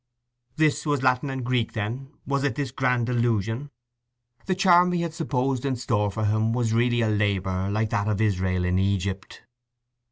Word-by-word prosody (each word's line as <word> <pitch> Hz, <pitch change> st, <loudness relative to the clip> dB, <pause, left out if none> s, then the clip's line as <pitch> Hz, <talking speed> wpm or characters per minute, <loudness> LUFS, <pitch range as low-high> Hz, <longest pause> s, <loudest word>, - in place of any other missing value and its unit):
This 155 Hz, -2 st, +2 dB
was 145 Hz, -3 st, 0 dB
Latin 130 Hz, +2 st, +2 dB
and 130 Hz, -2 st, -4 dB
Greek, 125 Hz, -2 st, 0 dB
then, 115 Hz, +6 st, -4 dB, 0.2 s
was 140 Hz, 0 st, -1 dB
it 140 Hz, -, 0 dB
this 140 Hz, -3 st, -3 dB
grand 125 Hz, -2 st, +1 dB
delusion! 120 Hz, +1 st, -1 dB, 0.8 s
The 185 Hz, -, +1 dB
charm 180 Hz, -2 st, +5 dB
he 170 Hz, -1 st, 0 dB
had 170 Hz, -2 st, -4 dB
supposed 135 Hz, -6 st, -1 dB
in 135 Hz, -2 st, 0 dB
store 110 Hz, -4 st, 0 dB
for 110 Hz, +2 st, -2 dB
him 110 Hz, +2 st, +1 dB
was 120 Hz, -2 st, 0 dB
really 120 Hz, +1 st, +2 dB
a 110 Hz, -, +2 dB
labour 100 Hz, -3 st, 0 dB
like 110 Hz, +1 st, -1 dB
that 100 Hz, -2 st, 0 dB
of 105 Hz, -2 st, 0 dB
Israel 95 Hz, -4 st, 0 dB
in 90 Hz, +1 st, +1 dB
Egypt. 95 Hz, 0 st, -2 dB
120 Hz, 180 wpm, -25 LUFS, 105-135 Hz, 0.8 s, charm